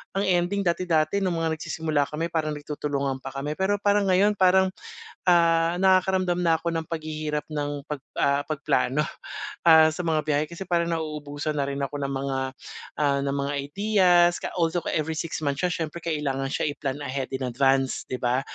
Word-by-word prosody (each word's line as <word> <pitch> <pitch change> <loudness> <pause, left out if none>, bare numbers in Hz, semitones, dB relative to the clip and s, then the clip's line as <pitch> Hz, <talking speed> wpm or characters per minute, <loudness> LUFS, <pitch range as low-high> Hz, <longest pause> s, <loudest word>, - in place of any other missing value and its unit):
ang 195 - +1
ending 185 +2 +1
dati-dati 170 -1 +1
nung 185 -3 0
mga 160 -1 -1
nagsisimula 155 -4 -1
kami 165 +3 -3
parang 155 -2 -1
nagtutulungan 145 -2 -3
pa 135 +1 -9
kami, 145 +5 -4
pero 195 +2 +2
parang 205 0 +2
ngayon, 200 +2 +3
parang, 190 0 +4 0.6
ah, 170 -1 +4
nakakaramdam 185 -1 +3
na 170 -2 +3
ako 170 +1 -3
ng 160 - -7
paghihirap 155 -2 -3
ng 145 -1 -3
pag 150 -2 -4 0.2
ah, 140 0 +2
pagplano, 150 -1 0 0.6
ah, 160 -2 +7
sa 180 - -3
mga 160 -2 +1
biyahe, 150 0 +2
kasi 170 +3 -7
parang 170 -1 +1
nauubusan 150 -2 -3
na 140 -1 -1
rin 140 - -4
ako 140 +1 -3
ng 140 - -1
mga 135 0 -2 0.9
ng 140 - -2
mga 145 - -2
ideas, 180 +1 +3
ka - - -3
also, 170 0 +1
every 160 0 -1
six 165 +1 -3
months 145 +1 -2
siya 180 - +2 0.2
siyempre 170 +2 -9
kailangan 140 -4 -2
siya - - -1
iplan 140 -1 -4
ahead 135 -2 -4
in 130 -1 -3
advance, 135 +1 +1
'di 130 - -2
ba. 125 +1 +1
155 Hz, 180 wpm, -25 LUFS, 145-175 Hz, 0.9 s, ah